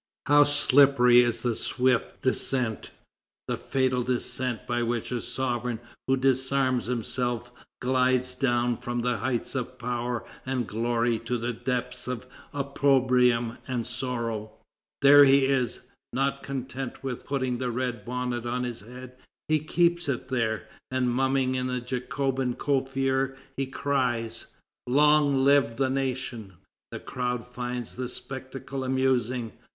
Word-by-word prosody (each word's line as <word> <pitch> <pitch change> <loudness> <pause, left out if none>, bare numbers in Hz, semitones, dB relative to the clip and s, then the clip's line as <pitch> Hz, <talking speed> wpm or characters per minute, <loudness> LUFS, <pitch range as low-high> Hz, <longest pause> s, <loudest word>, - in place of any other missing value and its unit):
How 145 0 +6
slippery 140 -4 +6
is 120 -1 0
the 120 -2 0
swift 125 0 0
descent, 130 -3 0 0.6
the - - 0
fatal 130 -2 0
descent 125 -1 -1
by 120 0 -1
which 120 0 -2
a 120 -2 -1
sovereign 120 -3 -2 0.3
who 135 0 +3
disarms 130 -1 +1
himself 120 0 -2 0.3
glides 130 0 +2
down 120 -2 +1
from 120 -1 -3
the 125 -1 +1
heights 120 +2 -2
of 130 -1 -4
power 120 -1 -3 0.2
and 130 -2 -1
glory 115 +1 0
to 120 +2 -2
the 120 +1 -2
depths 125 +1 -3
of 125 0 -4 0.3
opprobrium 130 -4 +2
and 125 -3 -2
sorrow! 115 -3 -3 0.5
There 145 +1 +9
he 135 0 +5
is! 130 -3 0 0.3
Not 140 +1 0
content 135 -1 -5
with 130 -3 -4
putting 130 -3 -1
the 130 -1 -1
red 120 -2 -2
bonnet 125 0 -3
on 125 +1 -1
his 120 -2 -4
head, 125 +3 -11 0.3
he 155 0 +3
keeps 170 +1 +1
it 130 -1 -3
there, 110 -4 -1 0.2
and 130 -1 0
mumming 130 0 +1
in 130 0 -1
the 125 0 -1
Jacobin 130 +1 -2
coiffure, 135 -1 0 0.2
he 135 -1 -2
cries: 125 -5 -1 0.4
"Long 145 0 +4
live 140 -4 +4
the 130 +1 +1
nation!" 130 -6 -3 0.4
The - - -5
crowd 125 -2 -3
find 125 0 -4
the 125 +2 -5
spectacle 135 +1 -6
amusing. 130 -3 0
125 Hz, 135 wpm, -27 LUFS, 120-135 Hz, 0.6 s, There